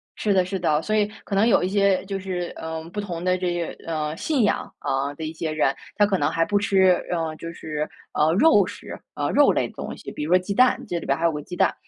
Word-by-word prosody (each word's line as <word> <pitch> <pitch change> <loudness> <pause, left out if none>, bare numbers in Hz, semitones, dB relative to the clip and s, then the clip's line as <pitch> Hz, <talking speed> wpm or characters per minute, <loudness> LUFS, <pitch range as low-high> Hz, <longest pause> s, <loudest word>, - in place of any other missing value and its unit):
是 210 - 0
的 185 -1 +4
是 190 +1 -3
的， 155 -3 +2
所 215 - -1
以 210 -1 +3 0.2
可 200 - -4
能 210 +3 +4
有 235 - +4
一 - - +1
些 200 -1 +2
就 195 0 -3
是， 180 -2 -4
呃， 160 0 -5
不 205 - -4
同 175 -4 -4
的 185 0 +2
这 180 -1 -1 0.2
个， - - -19
呃， 155 -2 -2
信 290 -7 +1
仰， 205 - 0
啊， 140 +2 -1
的 160 - -7
一 155 - -5
些 160 -1 -3
人， 155 -3 +2 0.2
他 205 - +4
可 200 -2 +1
能 - - +1
还 165 - +1
不 205 +2 +1
吃， 195 -2 +4 0.2
嗯， 160 -2 -2
就 165 +1 -7
是， 155 -1 -4 0.3
呃， 155 +1 +3
肉 210 - +5
食， - - -8
啊， - - -2
肉 - - +5
类 - - 0
的 - - -15
东 - - -6
西， - - -8
比 - - -5
如 155 - -3
说 185 - +6
鸡 190 +2 -4
蛋 255 +4 +3
这 175 - -2
里 - - -9
边 140 - +1
还 165 - -1
有 165 - +4
个 150 - -5
鸡 180 - -8
蛋。 - - +2
180 Hz, 295 characters per minute, -24 LUFS, 160-200 Hz, 0.3 s, 说